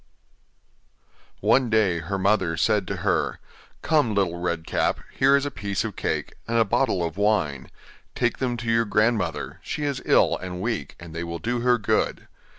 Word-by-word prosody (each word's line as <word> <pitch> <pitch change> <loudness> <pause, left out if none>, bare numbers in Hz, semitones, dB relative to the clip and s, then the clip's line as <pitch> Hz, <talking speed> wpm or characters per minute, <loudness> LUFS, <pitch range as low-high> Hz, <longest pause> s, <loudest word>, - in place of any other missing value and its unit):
One 130 -2 +3
day 105 -6 +2
her 95 +4 -3
mother 95 -4 +1
said 105 +1 +2
to - - -2
her: - - +1 0.5
'Come, 145 -9 +2
Little 90 -4 0
Red 85 -2 -2
Cap, - - 0
here 135 +1 +4
is 140 0 +1
a 145 - -3
piece 100 -2 -2
of 110 -3 -5
cake - - -2
and 115 0 0
a 115 - +4
bottle 95 -2 +1
of 85 +2 -4
wine; 95 -11 0 0.5
take - - 0
them 125 -2 -1
to 115 -1 -2
your 115 0 +3
grandmother, 105 -5 0
she 150 - -4
is 140 -2 -2
ill - - +4
and 90 -1 -6
weak, 110 - -3
and 85 -2 -10
they 85 +1 -4
will 85 0 -4
do 120 +9 -2
her 125 +1 +3
good. 105 - 0
105 Hz, 180 wpm, -24 LUFS, 85-120 Hz, 0.5 s, here